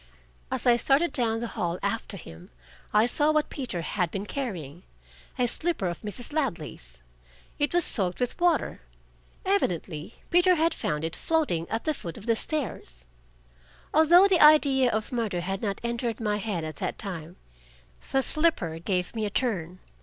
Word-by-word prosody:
As - - -3
I 240 -1 +6
started 280 +7 +2
down 225 -3 +1
the 235 - -3
hall 175 0 -2
after 200 0 -2
him, 85 - -12 0.4
I 210 +1 +5
saw 295 +5 +3
what 305 -1 +1
Peter 240 -11 -4
had 180 0 -1
been 195 +4 -4
carrying 180 - -5 0.6
a 250 - +2
slipper 325 - -1
of 175 -2 -3
Mrs. 215 +6 -7
Ladley's. 165 - -3 0.6
It 290 - +2
was 350 0 +3
soaked 180 -5 +1
with 250 +6 -2
water; 350 -1 +1 0.6
evidently 180 - -1 0.2
Peter 355 +1 +5
had 325 0 +2
found 150 - -2
it 165 - -3
floating 290 - 0
at 225 - -2
the 310 - +1
foot 170 - -7
of 210 - -9
the 230 -1 +2
stairs. 205 - -4 0.9
Although 345 +5 +7
the 375 -3 +3
idea 280 -4 +6
of 220 -2 -2
murder 220 -8 -1
had 195 +2 -3
not 200 -3 -2
entered 235 -1 -2
my 210 -2 0
head 200 -5 -3
at 155 -2 -6
that - - -3
time, 175 -5 -6 0.8
the 270 0 +2
slipper 255 - 0
gave 180 +3 -2
me 220 -2 -1
a - - -3
turn. 185 -7 -1
225 Hz, 170 wpm, -27 LUFS, 175-290 Hz, 0.9 s, Although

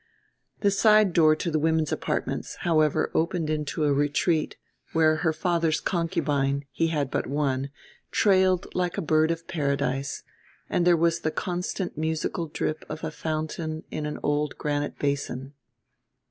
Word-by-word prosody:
The 200 - +3
side 210 -1 +5
door 155 -2 +5
to 170 +2 -3
the 155 - +1
women's 160 -1 +1
apartments, - - -2
however, 155 -2 +2
opened 165 -1 0
into 150 0 -2
a 145 -1 +3
retreat, 145 +3 +1 0.4
where 155 -1 +4
her 160 0 +1
father's 165 0 +1
concubine, 145 -5 0
he 165 - +1
had 145 -5 -1
but - - -1
one, 140 -1 -1 0.4
trailed 190 -2 +3
like 180 -1 -1
a - - 0
bird 155 0 +3
of 165 0 -3
paradise, 140 -4 -1 0.5
and 175 - +2
there 175 -1 +6
was 170 0 +2
the 155 - -1
constant 180 0 -3
musical 160 +1 -1
drip 155 0 -3
of 155 +1 -6
a - - -2
fountain 155 0 -3
in 150 -1 -3
an 150 - -4
old 145 0 0
granite 145 -1 -2
basin. 140 -1 -2
155 Hz, 150 wpm, -26 LUFS, 145-170 Hz, 0.5 s, there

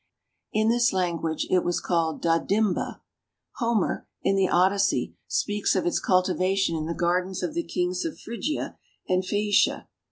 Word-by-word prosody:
In 215 +1 +2
this 240 +1 +3
language 170 -4 -1
it 180 -1 +3
was 175 - 0
called 165 -3 -1
"Dadimba." 180 +4 +1 0.6
Homer, 230 -5 0 0.2
in 195 - +2
the 195 -1 +2
Odyssey, 195 +3 +2
speaks 205 -1 0
of 185 - 0
its 175 - +1
cultivation 185 -1 +1
in 155 -1 -3
the 170 - -3
gardens 180 +2 0
of 305 - -2
the 340 - 0
kings 180 - -1
of 330 - -4
Phrygia 235 +7 -4 0.3
and 185 0 +2
Phaecia. 205 +1 +1
185 Hz, 150 wpm, -26 LUFS, 175-210 Hz, 0.6 s, this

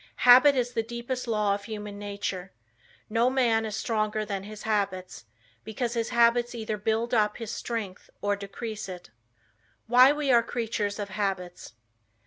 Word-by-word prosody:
"Habit 255 +3 +8
is 245 -1 -1
the 230 - +1
deepest 240 +2 -5
law 210 -3 +1
of 200 0 -5
human 210 -2 -7
nature." 200 -2 -5 0.6
No 230 +3 +2
man 235 -4 +2
is 215 - -4
stronger 215 -2 -1
than 195 -2 -4
his 210 0 -9
habits, 195 - -2 0.4
because 230 +2 -3
his 230 -1 -1
habits 235 +1 +3
either 220 -2 -3
build 225 +3 -1
up 210 -2 +2
his 230 -3 -6
strength 215 -6 -5
or 205 0 0
decrease 210 +1 -6
it. 180 -10 -9 0.7
Why 250 +3 +7
We 295 -2 0
Are 235 -1 +6
Creatures 225 -3 -3
of 205 -1 -4
Habits. 190 - -4
220 Hz, 155 wpm, -27 LUFS, 205-235 Hz, 0.7 s, Habit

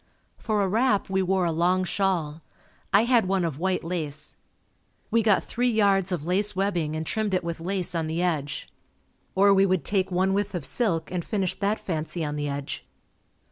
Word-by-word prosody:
For 215 -3 0
a - - +1
wrap 215 -1 +1
we 190 0 +2
wore 190 0 +1
a 170 - +1
long 180 +3 +2
shawl. 175 -5 -1 0.5
I 200 +3 +5
had 235 -4 +3
one 190 -2 +1
of 155 -4 -3
white 185 +1 0
lace. 155 -3 -4 0.8
We 230 +1 +4
got 210 -3 +3
three 245 +1 0
yards 200 -4 +2
of 165 -4 -2
lace 195 +4 +1
webbing 175 -6 0
and 160 0 -3
trimmed 210 +2 0
it 180 - 0
with 170 -1 -4
lace 180 +1 -2
on 165 -2 -1
the 160 +2 -2
edge. 155 -5 -1 0.7
Or 200 +1 +6
we 195 0 +4
would 185 -6 0
take 195 -2 0
one 190 +1 +1
width 205 0 -1
of 165 -6 -2
silk 170 - 0
and 180 -2 -2
finish 195 -3 -1
that 205 +2 +1
fancy 160 -1 -3
on 150 0 -3
the 145 0 -2
edge. 140 - -4
185 Hz, 195 wpm, -26 LUFS, 165-200 Hz, 0.8 s, Or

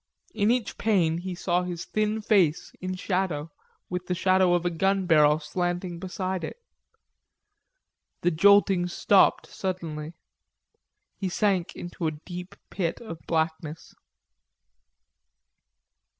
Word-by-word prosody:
In 205 0 +2
each 245 -2 0
pane 175 -7 +2
he 185 0 -5
saw 175 0 0
his 175 -2 -5
thin 215 0 -1
face, 180 -8 +2
in 185 0 -3
shadow, 180 -5 -2 0.4
with 180 0 -4
the 180 - 0
shadow 185 0 +3
of 175 0 -1
a 175 - +1
gun 195 +3 +1
barrel 150 -3 +5
slanting 175 +2 -3
beside 185 0 -3
it. - - -5 1.6
The 175 - +2
jolting 195 +1 +5
stopped 190 +2 +3
suddenly. 165 -4 -5 1.0
He 190 - -1
sank 190 -2 0
into 175 -1 -4
a 155 - -1
deep 180 0 -7 0.2
pit 175 -4 -2
of 220 -9 -8
blackness. 160 -1 -2
180 Hz, 120 wpm, -26 LUFS, 165-190 Hz, 1.6 s, barrel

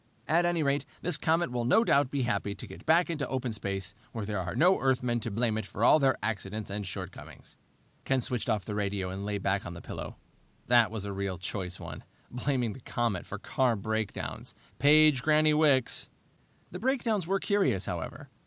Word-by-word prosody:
At 170 +2 +3
any 170 -2 +1
rate, 140 0 +1 0.2
this 175 -2 +1
comet 160 0 +1
will 120 -1 -1
no 130 - +4
doubt 140 - +3
be 140 -1 -1
happy 100 -4 -1
to - - -8
get - - -12
back 170 +2 +4
into 150 -3 -2
open 130 -2 -2
space, 100 -3 -4 0.2
where 110 -3 -4
there 105 -1 -2
are 90 +1 -4
no 175 +9 +4
Earthmen 125 -3 +1
to 115 - -4
blame 110 +1 0
it 110 - -5
for 105 - -4
all 155 - +7
their 135 -3 +3
accidents 105 -1 -3
and 100 -1 -3
shortcomings!" 95 0 -8 0.5
Ken 135 0 +1
switched 125 -1 -1
off 105 -3 0
the 105 - -4
radio 100 -2 -2
and 95 +2 -5
lay 105 0 -1
back 100 0 0
on 85 - -7
the - - -7
pillow. - - -7 0.5
That 120 -3 +5
was 105 -2 -5
a 100 - -4
real 95 -1 -3
choice 90 0 -5
one - - -8 0.3
blaming 125 -3 -1
the - - -11
comet 115 -6 -2
for 100 - -5
car 125 +3 +1
breakdowns! 110 +1 -4 0.2
Page 150 -1 +6
Granny 155 +1 +4
Wicks! 145 -5 +2 0.6
The 180 - -6
breakdowns 230 -6 0
were 195 +1 +1
curious, 195 - +1
however. - - -6
120 Hz, 200 wpm, -29 LUFS, 100-150 Hz, 0.6 s, all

